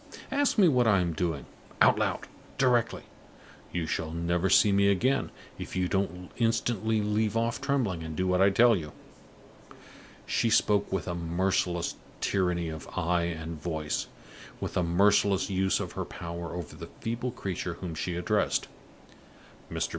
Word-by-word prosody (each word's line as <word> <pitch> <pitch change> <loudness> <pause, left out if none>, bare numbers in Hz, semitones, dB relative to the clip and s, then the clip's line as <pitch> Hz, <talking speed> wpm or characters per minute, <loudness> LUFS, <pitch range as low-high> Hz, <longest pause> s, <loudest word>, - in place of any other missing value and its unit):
Ask 285 -1 +2
me 195 -4 +7
what 125 -6 +3
I 100 -3 +5
am 85 -2 0
doing. 80 -3 -2 0.3
Out - - +5
loud! - - -1 0.3
Directly! 125 -3 +2 0.7
You 85 -2 -2
shall 80 +1 -2
never 85 +3 0
see 100 +2 +6
me 100 0 +4
again, 125 +8 +1 0.3
if - - -6
you 90 -1 +1
don't 90 -2 -2
instantly 110 -2 +1
leave 105 +1 0
off 115 +1 -1
trembling 115 -12 0
and 80 -1 -6
do 95 - 0
what 90 0 +2
I 100 - +6
tell 115 +4 +5
you!" 75 -5 -5 1.3
She 115 - +1
spoke 105 -2 +2
with 95 -4 -2
a 85 - -1
merciless 85 +1 -1 0.2
tyranny 90 -3 0
of 80 -3 -7
eye 85 +1 +1
and 80 -2 -5
voice 80 -3 -2 0.5
with - - -4
a - - +2
merciless 100 +3 +3
use 95 0 +1
of - - -4
her - - -3
power 85 0 -6
over 90 -3 -6
the - - -9
feeble 115 +2 -2
creature 95 -7 -4
whom 90 -2 -6
she 85 +2 -3
addressed. 100 +4 0 1.0
Mr. - - -1
95 Hz, 160 wpm, -28 LUFS, 85-110 Hz, 1.3 s, me